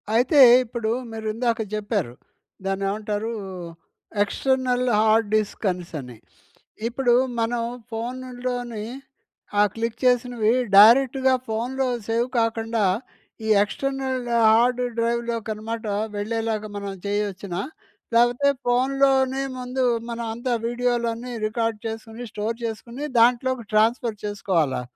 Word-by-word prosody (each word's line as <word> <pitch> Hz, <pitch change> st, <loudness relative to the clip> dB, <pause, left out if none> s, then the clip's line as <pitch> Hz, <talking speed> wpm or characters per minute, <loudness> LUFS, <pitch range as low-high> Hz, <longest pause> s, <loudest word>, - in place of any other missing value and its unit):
అయితే 270 Hz, +5 st, +4 dB, 0.2 s
ఇప్పుడు 225 Hz, -2 st, -3 dB, 0.2 s
మీరు 220 Hz, -1 st, -6 dB
ఇందాక 230 Hz, 0 st, 0 dB, 0.2 s
చెప్పారు. 205 Hz, -, -2 dB, 0.5 s
దాన్నేమంటారు? 205 Hz, +3 st, -2 dB, 0.9 s
External 255 Hz, +2 st, 0 dB
hard 220 Hz, 0 st, +3 dB
disk 215 Hz, 0 st, -1 dB
అనేసని. 155 Hz, -9 st, -7 dB, 0.7 s
ఇప్పుడు 240 Hz, 0 st, +1 dB, 0.3 s
మనం 230 Hz, +1 st, 0 dB, 0.3 s
ఫోనుల్లోని 245 Hz, -1 st, -4 dB, 0.8 s
ఆ -, -, +7 dB
క్లిక్ 230 Hz, 0 st, -3 dB
చేసినవి 245 Hz, -2 st, +2 dB, 0.2 s
డైరెక్ట్‌గా 260 Hz, +4 st, +6 dB
ఫోన్‌లో 250 Hz, +4 st, -1 dB, 0.2 s
సేవ్ 235 Hz, +2 st, +1 dB
కాకుండ 225 Hz, 0 st, -1 dB, 0.7 s
ఈ -, -, -2 dB, 0.2 s
ఎక్స్టర్నల్ 265 Hz, +1 st, -3 dB, 0.2 s
హార్డ్ 245 Hz, +3 st, +4 dB, 0.2 s
డ్రైవ్‌లోకి 235 Hz, -1 st, -1 dB
అనమాట 225 Hz, +2 st, -6 dB, 0.3 s
వెళ్ళేలాగా 220 Hz, 0 st, -2 dB
మనం 200 Hz, -1 st, -5 dB
చేయొచ్చునా? 200 Hz, -3 st, -2 dB, 0.5 s
లేకపోతే 245 Hz, +4 st, +4 dB, 0.2 s
ఫోన్‌లోనే 265 Hz, +1 st, +2 dB, 0.2 s
ముందు 250 Hz, +1 st, -2 dB, 0.3 s
మనం 235 Hz, 0 st, -4 dB
అంతా 240 Hz, +2 st, -2 dB
వీడియోలన్నీ 240 Hz, 0 st, -1 dB
రికార్డ్ 225 Hz, 0 st, -2 dB
చేసుకొని 225 Hz, +2 st, -7 dB
స్టోర్ 220 Hz, +2 st, -3 dB
చేసుకొని 235 Hz, +5 st, -5 dB
దాంట్లోకి 245 Hz, 0 st, +3 dB
ట్రాన్స్ఫర్ 225 Hz, +1 st, +2 dB
చేసుకోవాలా? 170 Hz, -10 st, 0 dB
230 Hz, 100 wpm, -24 LUFS, 215-250 Hz, 0.9 s, ఆ